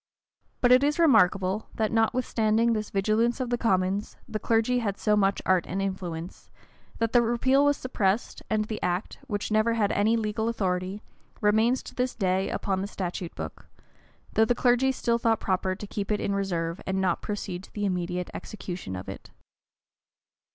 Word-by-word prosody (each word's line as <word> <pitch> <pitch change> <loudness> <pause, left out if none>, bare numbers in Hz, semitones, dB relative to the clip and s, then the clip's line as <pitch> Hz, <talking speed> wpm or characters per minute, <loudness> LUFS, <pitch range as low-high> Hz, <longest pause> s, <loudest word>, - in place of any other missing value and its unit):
* - - -44
But 245 - +4
it 255 +2 +7
is 295 +2 +2
remarkable, 205 - +3
that 220 -1 0
notwithstanding 225 0 +2
this 215 -1 -2
vigilance 215 +5 +1
of 250 -2 -2
the 240 - +2
commons, 195 -2 0
the 215 - -4
clergy 230 +3 +2
had 200 -4 -2
so 210 -1 +2
much 200 -1 +1
art 185 -2 +2
and 190 - -3
influence, 180 -3 -5 0.5
that 230 -1 0
the 240 - +6
repeal 250 +4 +3
was 290 0 +3
suppressed, 215 -4 -1
and 215 -1 +1
the 215 0 -5
act, 180 +3 -2
which 205 +1 -3
never 215 +2 +3
had 210 -2 +1
any 220 +3 +2
legal 220 0 -1
authority, 190 -2 -2 0.4
remains 220 +4 +3
to - - -10
this 250 0 -1
day 190 -2 0
upon 190 -1 -1
the 195 - -3
statute 180 -3 -5
book;[*] - - -7 0.7
though 220 - +4
the 245 - +1
clergy 245 +2 +3
still 235 -2 0
thought 225 -2 +2
proper 185 0 0
to 205 - -7
keep 205 0 -4
it 210 - +1
in 200 - -1
reserve 175 -3 -2
and 190 0 0
not 185 -2 +1
proceed 200 -4 -4
to - - -22
the 205 -1 -2
immediate 180 -1 -2
execution 180 - -6
of 90 - -7
it. - - -8
210 Hz, 180 wpm, -27 LUFS, 190-230 Hz, 0.7 s, it